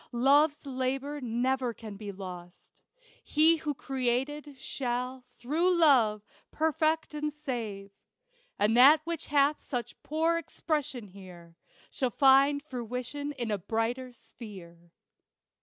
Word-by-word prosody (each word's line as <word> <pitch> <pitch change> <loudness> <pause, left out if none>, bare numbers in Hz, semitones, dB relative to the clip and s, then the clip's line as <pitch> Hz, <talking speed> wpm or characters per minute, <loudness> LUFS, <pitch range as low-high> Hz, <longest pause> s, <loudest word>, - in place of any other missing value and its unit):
Love's 285 +5 +3
labor 270 +2 -3
never 250 0 -1
can 215 -3 -9
be 205 0 -7
lost. 180 -2 -11 0.4
He 320 +2 +4
who 300 -2 -3
Created, 270 +3 -2
shall, 250 0 -3
through 315 +9 0
Love, 235 -11 +4 0.2
perfect 315 0 0
and 300 0 -2
save; 230 -10 -5 0.7
And 210 +2 +2
that 285 +5 +8
which 335 -1 -5
hath 285 +1 +2
such 245 -4 -5
poor 325 +2 0
expression 280 -10 -3
here, 180 -3 -13 0.4
Shall 255 - -1
find 275 +2 +4
fruition 255 +2 -5
in 240 -5 -4
a 205 - -1
brighter 230 +6 -2
sphere. 180 -8 -13
260 Hz, 115 wpm, -29 LUFS, 225-295 Hz, 0.7 s, that